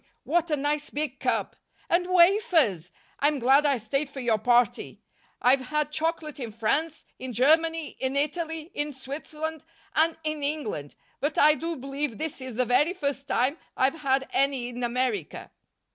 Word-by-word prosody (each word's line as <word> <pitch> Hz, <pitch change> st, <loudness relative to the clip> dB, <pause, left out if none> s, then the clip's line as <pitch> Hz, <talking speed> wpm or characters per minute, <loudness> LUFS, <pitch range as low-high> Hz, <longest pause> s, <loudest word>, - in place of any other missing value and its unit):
What 345 Hz, 0 st, +1 dB
a 300 Hz, -, +1 dB
nice 290 Hz, +1 st, -1 dB
big 290 Hz, -3 st, -3 dB
cup! -, -, -1 dB, 0.3 s
And 355 Hz, +1 st, +2 dB
wafers! 340 Hz, -, +3 dB, 0.3 s
I'm 295 Hz, +1 st, +2 dB
glad 270 Hz, +4 st, +4 dB
I 280 Hz, -2 st, +2 dB
stayed 275 Hz, +6 st, -2 dB
for 275 Hz, -, -8 dB
your 235 Hz, -4 st, +1 dB
party. 240 Hz, 0 st, +2 dB, 0.4 s
I've 260 Hz, +1 st, +3 dB
had 300 Hz, 0 st, -1 dB
chocolate 310 Hz, -1 st, -2 dB
in 235 Hz, -4 st, -5 dB
France, 295 Hz, +9 st, -1 dB
in 255 Hz, -1 st, -6 dB
Germany, 320 Hz, +6 st, +2 dB
in 260 Hz, +1 st, -1 dB
Italy, 320 Hz, +3 st, -2 dB
in 295 Hz, 0 st, -2 dB
Switzerland 305 Hz, +3 st, -6 dB, 0.3 s
and 320 Hz, +1 st, +2 dB
in 310 Hz, -1 st, -2 dB
England, 280 Hz, -, -3 dB, 0.2 s
but 290 Hz, +1 st, -2 dB
I 300 Hz, +1 st, +7 dB
do 330 Hz, +2 st, -3 dB
believe 275 Hz, -2 st, -4 dB
this 315 Hz, -3 st, -3 dB
is 260 Hz, -3 st, -6 dB
the 250 Hz, +2 st, +1 dB
very 265 Hz, +8 st, +3 dB
first 280 Hz, -4 st, -3 dB
time 270 Hz, +6 st, +1 dB, 0.2 s
I've 270 Hz, +5 st, +1 dB
had 265 Hz, -1 st, +1 dB
any 270 Hz, -3 st, +1 dB
in 245 Hz, 0 st, -6 dB
America." 240 Hz, -, -2 dB
285 Hz, 160 wpm, -26 LUFS, 255-315 Hz, 0.4 s, I